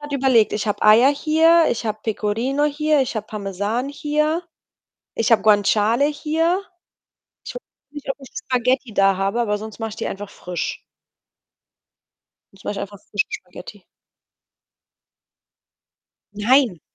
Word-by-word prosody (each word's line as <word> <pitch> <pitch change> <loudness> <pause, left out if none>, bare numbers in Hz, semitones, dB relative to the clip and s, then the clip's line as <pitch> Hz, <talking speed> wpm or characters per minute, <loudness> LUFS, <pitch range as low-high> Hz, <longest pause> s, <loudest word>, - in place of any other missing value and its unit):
grad 295 0 -8
überlegt. 260 -5 +3
Ich 210 +1 -2
habe 205 - -2
Eier 220 +5 +7
hier, 320 +3 +4
ich 230 - -3
habe 215 0 -2
Pecorino 230 +6 -1
hier, 300 0 +1
ich 255 -3 -2
habe 215 -1 -4
Parmesan 210 +5 -3
hier, 305 +3 -1 0.7
ich 225 +1 0
habe 225 - +5
Guanciale 215 +4 +3
hier. 320 +5 0 0.8
Ich - - -8
weiß - - -7 0.3
nicht, 290 -1 -7
ob - - -2
ich 270 - -12
Spaghetti 255 -1 -1
da 195 -1 +3
habe, 195 +5 -1
aber 210 -3 0
sonst 220 +1 -9
mache 225 -1 -4
ich 215 - -10
die - - -4
einfach 200 +1 -7
frisch. 180 -3 -5 1.7
Sonst 195 - -19
mache - - -2
ich - - -4
einfach 205 0 -7
frische 205 - 0
Spaghetti. 180 +2 -10 2.5
Nein! 215 - +2
230 Hz, 140 wpm, -21 LUFS, 205-285 Hz, 2.5 s, Eier